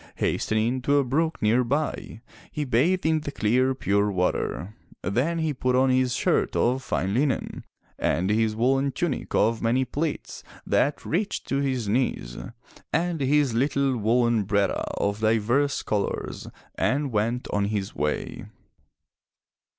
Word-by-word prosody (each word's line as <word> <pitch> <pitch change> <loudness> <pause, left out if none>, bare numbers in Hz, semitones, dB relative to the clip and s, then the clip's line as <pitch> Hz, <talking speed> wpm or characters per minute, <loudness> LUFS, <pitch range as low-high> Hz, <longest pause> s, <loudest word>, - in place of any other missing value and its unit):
Hastening 115 +4 0
to 140 +3 +2
a 140 - +4
brook 160 +6 0
nearby, 125 +2 0 0.3
he 150 -2 -3
bathed 150 +10 +2
in 160 0 +3
the 145 -1 -5
clear 130 +2 +1
pure 100 -3 +1
water, 90 +1 -1 0.3
then 130 - 0
he 160 -2 0
put 125 -1 0
on 130 +1 +4
his 130 0 +2
shirt - - +1
of 125 +2 +2
fine 95 -6 -1
linen, 135 +3 -1 0.3
and 95 +4 +1
his 110 0 +1
woolen 135 +4 +1
tunic 175 -7 -2
of 115 +2 +2
many 125 +3 +2
pleats 150 +3 -4 0.2
that 145 +2 +1
reached 195 +6 -2
to 135 - +1
his 130 -5 -1
knees, 105 - -1 0.6
and 170 -1 0
his 140 -1 +2
little 135 +2 +1
woolen 115 0 +2
bratta 100 0 0
of 100 +1 -1
divers 115 +6 +1
colors 105 -2 -3 0.3
and 140 0 0
went 115 +3 -1
on 100 -1 +1
his 100 -2 -2
way. 75 +1 -3
125 Hz, 140 wpm, -25 LUFS, 110-140 Hz, 0.6 s, a